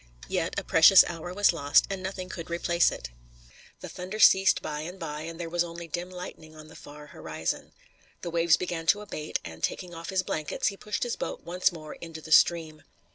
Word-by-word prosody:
Yet - - -2
a - - -1
precious 180 +4 +8
hour 170 +1 -6
was 205 0 +3
lost, 145 -3 +3
and 195 -1 -4
nothing 190 -1 -5
could 170 -2 -8
replace 170 0 +2
it. - - -7 0.7
The - - -6
thunder 185 +4 -7
ceased 195 -2 +6
by 150 -1 -5
and 175 +5 -7
by 150 -3 -5
and 165 +1 -7
there 170 - -4
was 175 +1 0
only 170 0 -8
dim 175 +3 -4
lightning 180 -3 -9
on 155 0 -12
the - - -14
far 150 +1 -12
horizon. 80 - -5 0.5
The 170 - -4
waves 165 0 +3
began 170 -2 -4
to 205 - +4
abate, 155 -7 -4
and, 80 0 -9
taking 180 -2 -2
off 165 0 -8
his 190 -1 0
blankets, 155 0 -2
he 200 - -8
pushed 210 +1 -3
his 240 -1 -2
boat - - -5
once 180 +2 +1
more 155 -3 -9
into 165 -1 -9
the 160 0 -11
stream. 160 -1 +4
170 Hz, 210 wpm, -27 LUFS, 155-180 Hz, 0.7 s, precious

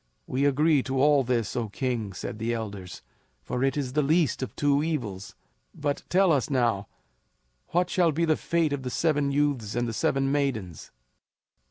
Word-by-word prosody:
"We 135 +2 0
agree 145 +1 +3
to 130 +1 -2
all 145 0 +5
this, 120 -4 -1
O 115 -3 -2
King," 115 0 -2
said 105 +4 -6
the 115 +1 -1
elders; 100 -5 -7 0.4
"for 125 - -2
it 135 +2 +1
is 130 -3 -2
the 150 - +2
least 155 0 +2
of 130 - -5
two 145 -1 +2
evils. 120 - -3 0.4
But 145 -1 -2
tell 190 0 +4
us 140 -2 +1
now, 115 -7 +1 0.8
what 175 +1 +1
shall 175 -3 +3
be 165 +3 0
the 160 -1 +3
fate 165 -3 0
of 140 - -2
the 130 - -4
seven 145 0 +1
youths 140 -7 0
and 120 0 0
the 115 - -3
seven 135 +4 +1
maidens?" 120 - -2
135 Hz, 180 wpm, -27 LUFS, 115-150 Hz, 0.8 s, all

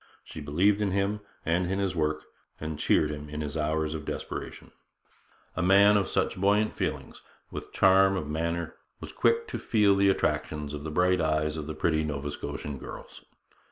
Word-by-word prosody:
She 80 - -9
believed 95 +9 +2
in 105 - +1
him 100 +2 0 0.3
and 90 +2 +1
in 95 - 0
his 100 -2 -1
work, 75 -1 0 0.4
and 75 -1 -5
cheered 75 0 +2
him 75 0 -7
in 75 +1 -5
his 75 0 -4
hours 80 0 0
of 80 -1 -5
depression. - - -6 0.8
A - - -1
man 100 +3 +6
of 100 -2 +2
such - - 0
buoyant 105 +2 +2
feelings, - - -4 0.3
with - - -6
such - - -25
charm 95 0 +5
of 75 - -4
manner, 85 +2 -3 0.2
was - - -8
quick 460 0 +1
to - - -4
feel 105 -4 +3
the 100 0 +4
attractions 75 -5 -1
of 75 -1 -6
the 80 - -4
bright 90 +3 +2
eyes 75 -1 0
of 75 -2 -5
the 80 - -5
pretty 80 0 +1
Nova 75 -1 -3
Scotian 70 -1 -5
girls. - - -10
80 Hz, 190 wpm, -28 LUFS, 75-95 Hz, 0.8 s, man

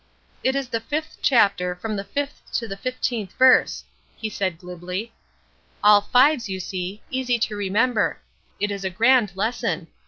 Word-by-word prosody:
"It 260 +1 +2
is 275 -3 -2
the 230 - -1
fifth 305 +7 -4
chapter, 200 -8 +3
from 215 +4 -4
the 195 - -3
fifth 285 +6 -4
to 230 - -1
the 195 - -5
fifteenth 235 -3 -3
verse," 260 0 +4 0.3
he 220 - -4
said, 190 -4 -2
glibly. 180 +5 -6 0.7
"All 210 0 +7
fives, 250 +1 +3
you 190 -1 -3
see. 185 +2 -5
Easy 255 -2 0
to 220 -2 -1
remember. 205 +3 +1 0.4
It 205 0 0
is 200 -1 -4
a 190 - -1
grand 230 +2 +3
lesson. 205 -5 -2
215 Hz, 160 wpm, -23 LUFS, 190-250 Hz, 0.7 s, All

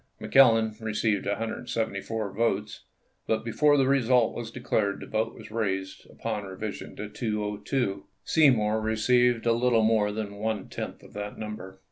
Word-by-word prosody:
McClellan 115 -5 +5
received 105 -2 0
174 110 -1 -3
votes, 105 -2 -1 0.4
but 110 0 0
before 145 +5 +3
the 135 - +4
result 125 -3 +3
was 120 -2 -5
declared 110 -4 -1
the - - -8
vote 110 +1 -2
was - - -12
raised 95 -4 -3
upon 110 -2 -4
revision 100 +2 -6
to 105 - -5
202; 105 0 -2 0.2
Seymour 110 -8 +3
received 120 +2 +2
a 115 - +4
little 120 -1 +3
more 110 -2 +3
than 105 -1 -5
one 110 -1 -3
tenth - - -6
of - - -15
that 105 0 -6
number. 105 -3 -7
110 Hz, 145 wpm, -27 LUFS, 105-115 Hz, 0.4 s, McClellan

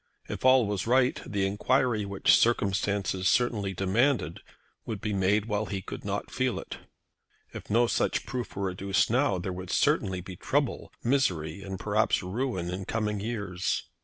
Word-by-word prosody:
If - - -6
all 130 -2 +6
was 100 0 -2
right 125 +1 +3
the 100 -1 0
enquiry 110 +2 +1
which 100 -1 +4
circumstances 100 -4 +1
certainly 105 -6 +1
demanded 95 - +1 0.4
would 110 -3 -5
be 105 +1 -2
made 100 +2 +2
while 105 -1 -1
he 95 -1 -4
could - - -7
not - - -3
feel - - 0
it. - - -8 0.8
If - - -9
no 120 +3 +4
such - - 0
proof 125 -6 -5
were 95 -1 -1
adduced 95 +3 +1
now 125 -5 +2
there 90 +1 -4
would 90 0 -7
certainly 95 -1 +2
be 95 +1 -9
trouble, 140 +8 -1
misery, 100 - 0
and 95 -1 -6
perhaps 105 -1 +1
ruin 95 -3 -2
in 95 +1 -4
coming 105 -1 -1
years. 100 -4 -2
100 Hz, 160 wpm, -28 LUFS, 95-120 Hz, 0.8 s, all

